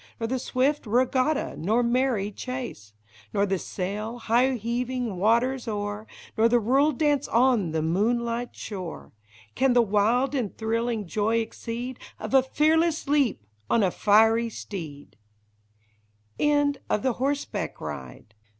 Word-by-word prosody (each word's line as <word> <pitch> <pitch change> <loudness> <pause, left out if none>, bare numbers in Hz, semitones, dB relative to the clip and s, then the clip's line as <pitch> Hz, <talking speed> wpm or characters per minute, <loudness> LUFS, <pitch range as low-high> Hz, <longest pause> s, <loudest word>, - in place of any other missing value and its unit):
Nor 225 - -1
the 255 +3 -1
swift 265 +2 0
regatta, 255 +5 +1
nor 220 +8 +1
merry 235 -4 +1
chase. 245 - -6 0.4
Nor 200 - +3
the 195 -2 -1
sail, 210 +7 -4
high 245 +3 +2
heaving 240 -1 -2
waters 235 +6 +2
o'er. 205 0 -4 0.3
Nor 225 +1 +4
the 240 +1 +4
rural 270 +7 +3
dance 290 0 +1
on 235 -6 +3
the 160 0 -1
moonlight 235 +7 0
shore, 185 -6 -7 0.4
Can 265 -1 +2
the 240 -1 +5
wild 225 +6 +2
and 245 -8 -2
thrilling 225 -1 -1
joy 215 +5 0
exceed 235 +2 -4 0.2
Of 215 +2 -6
a 265 - +7
fearless 315 +4 +1
leap 275 - +1 0.2
on 230 - +3
a 185 - +2
fiery 225 +4 +4
steed! 160 -10 -8
235 Hz, 120 wpm, -26 LUFS, 210-255 Hz, 0.4 s, a